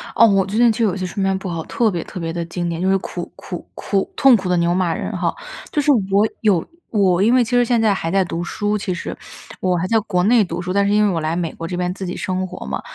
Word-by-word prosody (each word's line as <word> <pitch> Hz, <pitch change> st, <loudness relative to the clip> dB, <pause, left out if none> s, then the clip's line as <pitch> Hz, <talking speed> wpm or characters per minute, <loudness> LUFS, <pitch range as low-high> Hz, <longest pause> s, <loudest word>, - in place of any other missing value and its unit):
哦， 230 Hz, -, +7 dB
我 195 Hz, -3 st, +3 dB
最 200 Hz, +3 st, -3 dB
近 240 Hz, 0 st, +5 dB
就 225 Hz, +1 st, +1 dB
有 190 Hz, -4 st, 0 dB
些 185 Hz, -1 st, -3 dB
睡 185 Hz, +2 st, -4 dB
眠 195 Hz, 0 st, +1 dB
不 190 Hz, 0 st, -6 dB
好， 165 Hz, -2 st, -3 dB
特 230 Hz, -3 st, +1 dB
别 170 Hz, -3 st, -3 dB
特 185 Hz, -, -8 dB
别 165 Hz, -1 st, -3 dB
地 170 Hz, 0 st, -3 dB
经 175 Hz, +1 st, -3 dB
典， 170 Hz, +1 st, -3 dB
就 190 Hz, -, +1 dB
是 195 Hz, -, +4 dB
苦 175 Hz, -1 st, -6 dB
苦 180 Hz, -3 st, -8 dB
苦 195 Hz, -2 st, -1 dB
痛 270 Hz, -3 st, +6 dB
苦 190 Hz, -4 st, -2 dB
的 180 Hz, -, +3 dB
牛 170 Hz, 0 st, +2 dB
马 180 Hz, -2 st, +1 dB
人 -, -, -4 dB
哈。 -, -, 0 dB, 0.4 s
就 295 Hz, -, +1 dB
是 290 Hz, -, +3 dB, 0.2 s
我 200 Hz, +2 st, +4 dB, 0.2 s
有 195 Hz, -7 st, +2 dB, 0.2 s
我 190 Hz, -4 st, +2 dB
因 225 Hz, +4 st, +4 dB
为 255 Hz, -1 st, +5 dB
其 230 Hz, -, -6 dB
实 245 Hz, 0 st, +4 dB
现 235 Hz, -1 st, +2 dB
在 215 Hz, -2 st, +3 dB
还 165 Hz, -4 st, -3 dB
在 195 Hz, +2 st, +2 dB
读 170 Hz, -1 st, -4 dB
书， 210 Hz, +3 st, -1 dB
其 195 Hz, -2 st, -3 dB
实。 175 Hz, -, -5 dB, 0.5 s
我 185 Hz, -1 st, +1 dB
还 180 Hz, +2 st, -1 dB
在 225 Hz, +3 st, +3 dB
国 185 Hz, -4 st, 0 dB
内 230 Hz, +1 st, +5 dB
读 175 Hz, -2 st, -4 dB
书， 180 Hz, +1 st, -4 dB
但 200 Hz, 0 st, +2 dB
是 205 Hz, -, +2 dB
因 210 Hz, 0 st, +4 dB
为 205 Hz, -, +2 dB
我 165 Hz, -, -1 dB
来 155 Hz, +1 st, -1 dB
美 170 Hz, -2 st, -2 dB
国 165 Hz, -, -6 dB
这 180 Hz, -, -4 dB
边 180 Hz, 0 st, -1 dB
自 190 Hz, 0 st, -6 dB
己 180 Hz, -, -4 dB
生 185 Hz, 0 st, -2 dB
活 -, -, -8 dB
嘛， 70 Hz, +1 st, -3 dB
190 Hz, 320 characters per minute, -20 LUFS, 175-210 Hz, 0.5 s, 哦